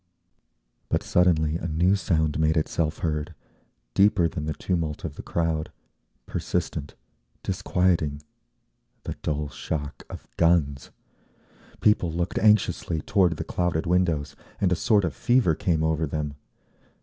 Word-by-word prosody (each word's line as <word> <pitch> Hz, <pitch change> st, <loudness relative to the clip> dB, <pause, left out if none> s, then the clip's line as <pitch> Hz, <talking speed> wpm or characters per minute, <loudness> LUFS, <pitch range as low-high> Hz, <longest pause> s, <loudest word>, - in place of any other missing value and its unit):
But -, -, 0 dB
suddenly 80 Hz, -3 st, +2 dB
a 85 Hz, -, -4 dB
new 85 Hz, +5 st, +3 dB
sound 80 Hz, -6 st, 0 dB
made 80 Hz, +1 st, +2 dB
itself 80 Hz, 0 st, 0 dB
heard, 75 Hz, +1 st, -2 dB, 0.6 s
deeper 100 Hz, -, +4 dB
than 75 Hz, -1 st, -5 dB
the 75 Hz, -, -2 dB
tumult 80 Hz, -5 st, -2 dB
of -, -, -4 dB
the -, -, -8 dB
crowd, 80 Hz, -2 st, -1 dB, 0.5 s
persistent, 70 Hz, -, -3 dB, 0.5 s
disquieting,—the 75 Hz, -10 st, -3 dB
dull 75 Hz, -1 st, -2 dB
shock 75 Hz, 0 st, -5 dB
of -, -, -9 dB
guns. 80 Hz, -5 st, +2 dB, 0.9 s
People 100 Hz, -5 st, +3 dB
looked 85 Hz, +2 st, -1 dB
anxiously 105 Hz, -6 st, +2 dB
toward 90 Hz, -3 st, +2 dB
the 80 Hz, -, -3 dB
clouded 85 Hz, -1 st, -1 dB
windows, 85 Hz, -4 st, +1 dB, 0.2 s
and 95 Hz, -3 st, +2 dB
a -, -, +4 dB
sort 100 Hz, +4 st, +3 dB
of 85 Hz, -, -2 dB
fever 120 Hz, -9 st, +3 dB
came 80 Hz, 0 st, 0 dB
over 80 Hz, 0 st, +1 dB
them. 75 Hz, 0 st, -3 dB
80 Hz, 125 wpm, -25 LUFS, 75-90 Hz, 0.9 s, deeper